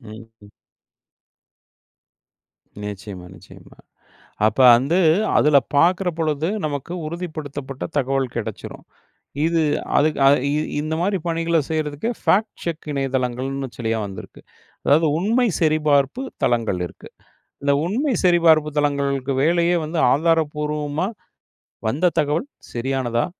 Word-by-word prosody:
ம் 110 Hz, -1 st, -11 dB, 0.2 s
ம். 100 Hz, -, -15 dB, 2.4 s
நிச்சயமா, 100 Hz, -3 st, -7 dB
நிச்சயமா. -, -, -16 dB, 0.7 s
அப்ப 110 Hz, -, -1 dB, 0.2 s
வந்து 140 Hz, +9 st, +1 dB, 0.4 s
அதில 150 Hz, -1 st, +4 dB, 0.2 s
பாக்கிற 180 Hz, +5 st, +3 dB
பொழுது 155 Hz, 0 st, 0 dB, 0.2 s
நமக்கு 145 Hz, +3 st, -5 dB
உறுதிப்படுத்தப்பட்ட 150 Hz, -5 st, -6 dB
தகவல் 135 Hz, -2 st, 0 dB
கெடைச்சுரும். 115 Hz, -, -6 dB, 0.6 s
இது 165 Hz, 0 st, +2 dB, 0.4 s
அதுக்கு 155 Hz, 0 st, +2 dB
அது 140 Hz, -, +6 dB, 0.2 s
இ -, -, +1 dB, 0.2 s
இந்த 155 Hz, +1 st, -3 dB
மாரி 195 Hz, +2 st, +1 dB
பணிகளை 165 Hz, 0 st, +1 dB
செய்யறதுக்கு 155 Hz, +5 st, -2 dB
ஃபேக்ட் 215 Hz, +3 st, +2 dB
செக் 165 Hz, -2 st, -5 dB
இணையதளங்கள்னு 135 Hz, 0 st, -2 dB
சில 115 Hz, -2 st, -4 dB, 0.2 s
வந்திருக்கு. 95 Hz, -2 st, -10 dB, 0.4 s
அதாவது 155 Hz, +3 st, +4 dB
உண்மை 230 Hz, +6 st, +2 dB
சரிபார்ப்பு 150 Hz, -, +2 dB, 0.2 s
தளங்கள் 115 Hz, -6 st, +1 dB
இருக்கு. -, -, -15 dB, 0.5 s
இந்த 140 Hz, 0 st, +2 dB
உண்மை 260 Hz, +9 st, 0 dB
சரிபார்ப்பு 165 Hz, -3 st, +4 dB
தளங்களுக்கு 140 Hz, -2 st, 0 dB
வேலையே 170 Hz, +2 st, +2 dB
வந்து 160 Hz, +2 st, -4 dB
ஆதாரப்பூர்வமா 150 Hz, +1 st, 0 dB, 0.8 s
வந்த 160 Hz, +9 st, +1 dB
தகவல் 155 Hz, -, 0 dB, 0.3 s
சரியானதா, 120 Hz, -1 st, -1 dB
150 Hz, 105 wpm, -21 LUFS, 135-165 Hz, 2.4 s, அது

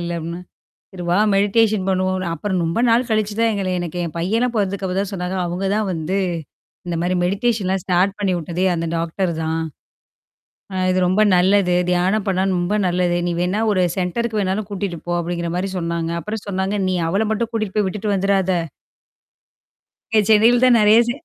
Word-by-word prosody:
இல்ல 175 Hz, 0 st, -3 dB
அப்படின்னா, 170 Hz, +2 st, -5 dB, 0.5 s
"சரி 180 Hz, -2 st, -8 dB
வா 180 Hz, -, +3 dB, 0.2 s
மெடிடேஷன் 205 Hz, 0 st, +2 dB
பண்ணுவோம்." 185 Hz, 0 st, 0 dB
அப்புறம் 190 Hz, -1 st, -2 dB
ரொம்ப 165 Hz, +6 st, -1 dB
நாள் 235 Hz, +2 st, +3 dB
கழிச்சு 215 Hz, -1 st, 0 dB
தான் 230 Hz, 0 st, +3 dB
எங்கள 195 Hz, -2 st, -2 dB
எனக்கு 175 Hz, 0 st, -4 dB
என் 165 Hz, -, -6 dB
பையன 225 Hz, +8 st, +1 dB
பொறந்துக்கப்புறம் 195 Hz, -2 st, -1 dB
தான் 200 Hz, 0 st, -6 dB
சொன்னாங்க. 180 Hz, 0 st, -3 dB
அவங்க 180 Hz, +3 st, -2 dB
தான் 215 Hz, -, 0 dB
வந்து 165 Hz, +4 st, -2 dB, 0.7 s
இந்த 175 Hz, -, -2 dB
மாரி 180 Hz, +1 st, 0 dB
மெடிடேஷன்லாம் 195 Hz, -1 st, 0 dB
ஸ்டார்ட் 190 Hz, +2 st, +1 dB
பண்ணி 195 Hz, -3 st, +1 dB
விட்டதே 175 Hz, +3 st, -2 dB
அந்த 165 Hz, 0 st, -2 dB
டாக்டர் 170 Hz, +2 st, -1 dB
தான். 160 Hz, +1 st, -1 dB, 1.1 s
அ -, -, -4 dB, 0.2 s
இது 185 Hz, -, +1 dB
ரொம்ப 185 Hz, +4 st, +2 dB
நல்லது. 185 Hz, 0 st, +3 dB, 0.2 s
தியானம் 185 Hz, +4 st, +1 dB
பண்ணாலும் 190 Hz, 0 st, +1 dB
ரொம்ப 175 Hz, +4 st, 0 dB
நல்லது. 180 Hz, 0 st, +1 dB
"நீ 175 Hz, -, 0 dB
வேணா 185 Hz, +5 st, 0 dB
ஒரு 185 Hz, -3 st, +2 dB, 0.2 s
சென்டருக்கு 215 Hz, +5 st, -1 dB
வேணாலும் 195 Hz, +2 st, -1 dB
கூட்டிட்டு 195 Hz, -4 st, -4 dB
போ" 175 Hz, -, -1 dB
அப்படிங்கிற 170 Hz, 0 st, -3 dB
மாரி 190 Hz, +2 st, -1 dB
சொன்னாங்க. 170 Hz, -1 st, -2 dB
அப்புறம் 210 Hz, +1 st, -5 dB
சொன்னாங்க 190 Hz, +1 st, -1 dB
நீ 185 Hz, -, 0 dB
அவள 200 Hz, +5 st, +1 dB
மட்டும் 225 Hz, +1 st, -1 dB
கூட்டிட்டு 215 Hz, -4 st, -3 dB
போய் 210 Hz, -2 st, +2 dB
விட்டுட்டு 205 Hz, +2 st, -3 dB
வந்துராத. 195 Hz, -1 st, +1 dB, 1.6 s
இங்க 220 Hz, -, +5 dB
சென்னையில 225 Hz, +3 st, +5 dB
தான் 250 Hz, -2 st, +6 dB
நெறைய 215 Hz, +1 st, +6 dB
ச -, -, +2 dB
190 Hz, 175 wpm, -20 LUFS, 180-210 Hz, 1.6 s, தான்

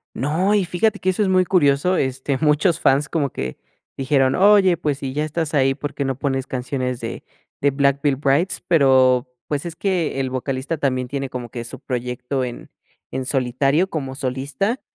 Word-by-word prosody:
No, 175 Hz, +9 st, +1 dB
y 200 Hz, -3 st, +2 dB
fíjate 205 Hz, +5 st, 0 dB
que 185 Hz, -, 0 dB
eso 185 Hz, +3 st, 0 dB
es 205 Hz, -, +2 dB
muy 185 Hz, -1 st, +3 dB
curioso, 170 Hz, 0 st, +3 dB
este, 130 Hz, +1 st, -1 dB
muchos 155 Hz, +3 st, +2 dB
fans 140 Hz, +1 st, +3 dB
como 150 Hz, -4 st, 0 dB
que 65 Hz, -, -5 dB, 0.4 s
dijeron: 135 Hz, -1 st, +2 dB
"Oye, 195 Hz, -2 st, +5 dB
pues, 145 Hz, -2 st, -2 dB
si 135 Hz, -2 st, -4 dB
ya 150 Hz, +2 st, -1 dB
estás 155 Hz, 0 st, -3 dB
ahí, 135 Hz, -2 st, +3 dB
¿por 145 Hz, 0 st, -5 dB
qué 140 Hz, -, -2 dB
no 135 Hz, -2 st, -2 dB
pones 135 Hz, -1 st, -2 dB
canciones 125 Hz, -1 st, -3 dB
de -, -, -6 dB, 0.4 s
de 140 Hz, -, +3 dB
Black 140 Hz, 0 st, +1 dB
Veil 145 Hz, -2 st, +2 dB
Brides?", 140 Hz, +6 st, +1 dB
pero, 130 Hz, -6 st, +4 dB, 0.2 s
pues, 145 Hz, 0 st, -2 dB
es 170 Hz, -1 st, -5 dB
que 175 Hz, -7 st, -1 dB
el 130 Hz, -1 st, -1 dB
vocalista 130 Hz, +4 st, -3 dB
también 130 Hz, -3 st, -1 dB
tiene 135 Hz, +1 st, -4 dB
como 125 Hz, -2 st, -6 dB
que 120 Hz, +1 st, -6 dB
su 115 Hz, -, -9 dB
proyecto 125 Hz, +1 st, -3 dB
en 120 Hz, -1 st, -7 dB, 0.4 s
en 130 Hz, 0 st, -3 dB
solitario 135 Hz, +7 st, +1 dB
como 135 Hz, -6 st, -4 dB
solista, 140 Hz, -, -2 dB
140 Hz, 190 wpm, -21 LUFS, 130-165 Hz, 0.4 s, Oye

